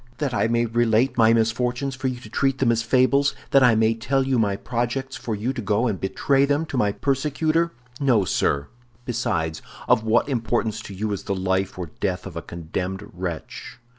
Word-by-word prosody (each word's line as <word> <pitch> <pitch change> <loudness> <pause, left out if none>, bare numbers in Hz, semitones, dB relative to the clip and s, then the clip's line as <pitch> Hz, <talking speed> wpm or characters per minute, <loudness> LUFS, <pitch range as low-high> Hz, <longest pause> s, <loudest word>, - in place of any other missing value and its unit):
"That 145 -4 -2
I 110 - +2
may 115 +1 +1
relate 120 +2 +2
my 115 -1 +5
misfortunes 125 +4 0
for 130 0 -3
you 125 -1 -3
to - - -11
treat 135 -1 +1
them 130 -3 +3
as 115 -1 +1
fables; 130 +3 +3 0.2
that 135 - +6
I 120 -3 +6
may 110 +1 +3
tell 135 +4 0
you 130 -2 +1
my 100 -3 +1
projects 120 +4 -3
for 120 -3 -4
you 115 +6 -2
to 130 - -4
go 105 +3 +1
and 105 -7 -1
betray 135 +8 +2
them 145 +3 +1
to - - -4
my 105 -4 +2
persecutor? 150 +7 0 0.3
No, 125 -8 +3
sir. 70 -4 0 0.4
Besides, 105 -11 -1 0.3
of 110 - +4
what 110 +3 +2
importance 115 -4 -1
to 100 - -8
you 105 +2 -2
is 100 - -4
the 100 - -1
life 95 0 -1
or 90 -4 -6
death 95 -2 -2
of 90 -4 -8
a 85 - -3
condemned 90 +4 -5
wretch? 90 +6 -6
115 Hz, 200 wpm, -23 LUFS, 100-130 Hz, 0.4 s, that